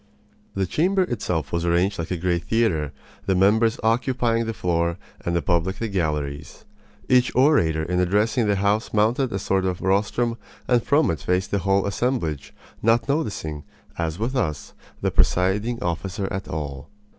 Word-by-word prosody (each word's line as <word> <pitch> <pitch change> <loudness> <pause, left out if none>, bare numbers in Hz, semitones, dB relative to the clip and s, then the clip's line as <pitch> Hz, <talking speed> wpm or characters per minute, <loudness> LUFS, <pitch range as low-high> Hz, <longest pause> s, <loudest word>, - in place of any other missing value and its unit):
The 95 -1 +1
chamber 185 - +2
itself 90 - -2
was 85 -1 -1
arranged 85 +3 +1
like 85 +1 -3
a 90 - -1
great 85 0 -1
theater, 90 -11 +1 0.4
the 95 - +2
members 110 +5 +3
occupying 115 0 +1
the 115 - -2
floor 85 -1 0 0.3
and 85 - -1
the 85 - 0
public 85 +2 +1
the 115 - -2
galleries. 75 -7 -3 0.4
Each 125 0 +4
orator 120 - +3
in 90 +2 -1
addressing 105 +6 +2
the 100 - +2
house 100 +3 0
mounted 115 +5 +2
a 95 - -1
sort 95 0 0
of 90 -2 -1
rostrum 105 +5 0 0.3
and 125 -2 +3
from 150 - +2
it 80 - -3
faced 90 +6 -1
the 100 - +1
whole 95 +1 +1
assemblage, 100 - -2 0.3
not 115 +3 +2
noticing, 100 - -2 0.4
as 80 -1 -2
with 115 +6 -2
us, 75 - -2 0.3
the - - 0
presiding 105 +7 +1
officer 95 +4 -2
at 95 0 -4
all. 70 -2 -5
95 Hz, 165 wpm, -23 LUFS, 85-115 Hz, 0.4 s, Each